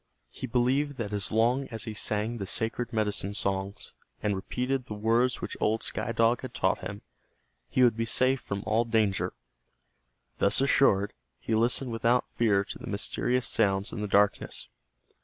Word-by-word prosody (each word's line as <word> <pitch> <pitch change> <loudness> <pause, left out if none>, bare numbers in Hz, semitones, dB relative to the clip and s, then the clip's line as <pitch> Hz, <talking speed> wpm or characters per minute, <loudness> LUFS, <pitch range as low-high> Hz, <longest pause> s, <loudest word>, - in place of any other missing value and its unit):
He 130 - -6
believed 130 +4 +1
that 105 -3 -4
as 100 -2 -1
long 120 +5 +2
as 115 -2 -4
he 110 - -5
sang 105 +2 -1
the 100 - -4
sacred 115 +3 -1
medicine 105 -3 -1
songs, 100 -1 -2 0.3
and 105 -1 +1
repeated 125 +6 -2
the 105 - -5
words 115 +4 +1
which - - -4
old 110 +1 +1
Sky - - -2
Dog 115 +1 +2
had 125 -1 -8
taught - - +1
him, 100 +1 -7 0.7
he 130 - +3
would 120 -3 +5
be 115 0 -2
safe 130 +2 +3
from 100 -1 -4
all 110 +2 +2
danger. 110 -4 0 1.1
Thus 100 - +3
assured, 105 -7 +3 0.3
he 115 - -3
listened 120 +3 +2
without 115 +2 +2
fear 105 -4 +2
to - - -7
the - - -9
mysterious 125 0 0
sounds 100 -2 +1
in 105 - -4
the 105 - -2
darkness. 100 0 +1
115 Hz, 170 wpm, -28 LUFS, 105-125 Hz, 1.1 s, would